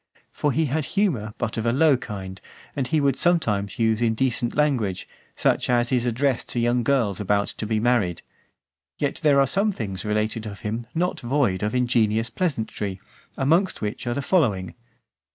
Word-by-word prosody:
For 145 - 0
he 160 +3 +1
had 150 +3 -1
humour, 125 - 0
but 120 -2 -3
of 110 - -2
a - - +3
low 145 +3 +4
kind, 95 -6 -7 0.3
and 135 -3 -1
he 155 +5 +1
would 140 -2 +1
sometimes 110 - +1
use 110 -1 +1
indecent 120 +1 0
language, 125 -11 0 0.3
such - - +1
as 120 -1 +2
is 125 -1 +1
addressed 130 +2 0
to 120 - -2
young 120 +1 +2
girls 115 -6 +1
about 100 0 +1
to 110 - -5
be 110 0 0
married. 110 -7 +1 0.7
Yet 145 - -2
there 145 -3 +4
are 135 - +5
some 200 +9 +3
things 100 - -5
related 110 +1 -1
of 100 -2 -8
him 115 +1 -4
not 180 +2 0
void 120 -6 0
of 105 +3 -1
ingenious 115 -2 +1
pleasantry; 110 - -2 0.4
amongst 165 - +1
which 105 +3 -4
are 120 - -1
the 140 - -2
following. 110 - +1
120 Hz, 175 wpm, -24 LUFS, 105-140 Hz, 0.7 s, are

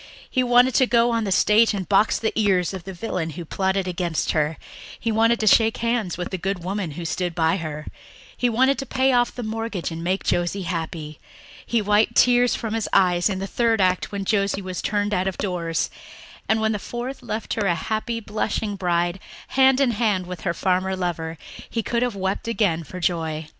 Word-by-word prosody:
He 255 - 0
wanted 245 +1 +4
to 260 +3 +4
go 235 0 +3
on 230 -1 0
the 195 - -2
stage 210 +4 +4
and 190 -3 -4
box 205 +2 +3
the 220 - -1
ears 195 -4 +2
of 185 -3 -7
the 195 - -6
villain 180 -4 -3
who 175 - -5
plotted 190 +2 -1
against 175 -4 -1
her; 155 0 0 0.4
he 230 - -1
wanted 230 +2 +3
to - - 0
shake 225 +1 +5
hands 230 -7 -1
with 180 - -4
the 190 - -3
good 190 0 -3
woman 185 -3 -3
who 170 +3 -6
stood 175 +2 -2
by 165 +2 +2
her; 155 -3 -5 0.5
he 245 - +1
wanted 260 +4 +2
to 270 - -5
pay 265 0 +2
off 245 -1 +2
the 245 - -5
mortgage 220 -5 -3
and 165 0 -5
make 185 +3 -1
Josie 175 +3 0
happy. 160 -3 -5 0.4
He 230 -2 0
wiped 210 +1 +2
tears 245 0 +4
from 225 -2 -4
his 225 -1 -2
eyes 180 -1 +3
in 190 - -2
the 190 - -3
third 230 +2 +1
act 185 -1 +1
when 200 -1 -4
Josie 200 -1 +1
was 185 -1 -4
turned 205 0 0
out 185 -1 0
of 190 - -3
doors 170 -4 -2 0.6
and, 220 - +3
when 220 0 +1
the 210 - -2
fourth 245 +5 -6
left 220 +1 -4
her 205 -3 0
a 175 - +2
happy, 220 +6 -2
blushing 215 -1 -2
bride, 175 -1 0 0.3
hand 265 0 +4
in 270 -3 +3
hand 210 -5 0
with 180 -2 -7
her 170 - -1
farmer 190 0 0
lover, 165 -3 -3 0.3
he 230 - -2
could 235 +2 -1
have 245 -3 0
wept 190 +3 -2
again 200 -8 +1
for 180 +5 -8
joy. 160 -3 -1
195 Hz, 210 wpm, -23 LUFS, 175-225 Hz, 0.6 s, shake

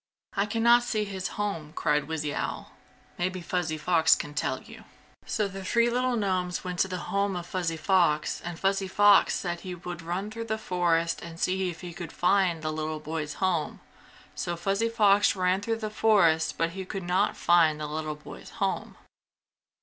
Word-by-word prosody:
"I 200 0 +1
can 225 +2 -1
not 240 +1 +7
see 220 -3 -1
his 190 -2 -4
home!" 165 -8 -3
cried 150 -2 0
Wizzy 155 -2 -2
Owl. - - -4 0.5
"Maybe 185 +1 -1
Fuzzy 175 -2 -2
Fox 160 +1 +4
can 145 - -6
tell 145 - -1
you!" - - -13 0.4
So 210 -3 0
the 195 0 -8
three 235 +4 +2
little 250 +1 +1
gnomes 185 -5 -1
went 180 -1 -5
to - - +3
the 185 -1 -4 0.2
home 200 -1 +1
of 175 -1 -4
Fuzzy 175 -2 -2
Fox 165 -3 +2
and 175 -1 -5
Fuzzy 195 0 +1
Fox 205 +1 +5
said 175 -2 -3
he 180 0 -6
would 175 0 -7
run 180 +5 -3
through 230 +1 -5
the 220 -1 -2
forest 170 -4 0
and 165 -1 -9
see 185 +1 0
if 165 -2 -8
he 175 -2 -7
could 170 0 -7
find 180 -3 +2
the 155 0 -2
little 155 0 -3
boy's 150 -1 -4
home. 180 -5 -1 0.5
So 175 - -3
Fuzzy 195 +6 0
Fox 205 -3 +4
ran 185 +1 +1
through 225 +2 -1
the 215 -1 -4
forest, 195 -8 +3
but 165 0 0 0.2
could 195 -3 -4
not 180 +2 +1
find 165 -3 +4
the 150 - -3
little 155 0 -4
boy's 150 - -11
home. - - -2
180 Hz, 190 wpm, -27 LUFS, 165-200 Hz, 0.5 s, not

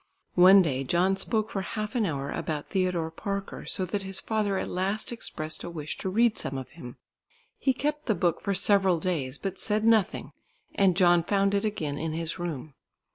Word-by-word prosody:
One 185 +2 +8
day 135 -5 -1
John 180 +7 +2
spoke 215 +2 -1
for 195 - -2
half 215 +2 -4
an 230 -5 +1
hour 140 -3 -3
about 155 -3 -4
Theodore 180 -4 0
Parker, 200 +3 -5
so 190 - -1
that 200 +3 -3
his 190 0 -3
father 210 -3 -1
at - - -2
last 195 +5 -2
expressed 155 -9 -3
a - - -5
wish 155 -3 -5
to 190 - -2
read 230 +3 +2
some 135 0 -3
of 130 -1 -7
him. 125 -1 -11 0.6
He 270 - +2
kept 295 +3 -2
the 220 - +2
book 170 -2 0
for 200 - -1
several 190 -2 +3
days, 155 -7 -2
but 195 -1 -5
said 210 0 0
nothing, 225 -4 +2 0.4
and 190 -3 +3
John 175 -2 +5
found 195 +3 +1
it 200 +1 +1
again 155 -9 -2
in 160 0 -3
his 165 +2 -4
room. 155 -4 -5
185 Hz, 195 wpm, -27 LUFS, 160-205 Hz, 0.6 s, One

